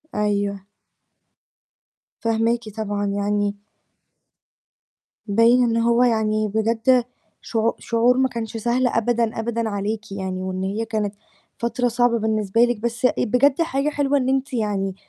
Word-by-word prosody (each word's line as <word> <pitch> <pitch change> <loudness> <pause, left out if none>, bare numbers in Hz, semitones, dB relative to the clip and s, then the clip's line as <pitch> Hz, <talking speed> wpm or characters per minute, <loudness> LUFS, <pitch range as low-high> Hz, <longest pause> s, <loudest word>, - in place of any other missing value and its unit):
أيوه. 200 -2 -1 1.6
فاهماكِ، 230 0 0
طبعًا 205 -1 -2
يعني 205 0 -1 1.7
باين 230 +4 +4
إن 230 -1 +1
هو 235 +1 +3
يعني 215 -2 +1
بجد 230 +4 +2 0.4
شعو 225 0 0
شعور 240 +2 +2
ما 260 0 +2
كانش 225 -1 -5
سهل 245 +3 +1
أبدًا 230 -1 0
أبدًا 230 0 -2
عليكِ 210 +1 -4
يعني، 190 -1 -4
وإن 185 0 -3
هي 205 +4 -2
كانت 210 -2 -2 0.4
فترة 235 +1 -1
صعبة 240 0 +2
بالنسبة 215 0 0
لِك، 240 -3 +1
بس 235 +2 -2
آآ - - +4
بجد 270 +7 +2
حاجة 295 -2 0
حلوة 285 -1 +1
إن 260 -1 0
أنتِ 270 0 -1
يعني 200 -4 -1
225 Hz, 130 wpm, -22 LUFS, 210-240 Hz, 1.7 s, باين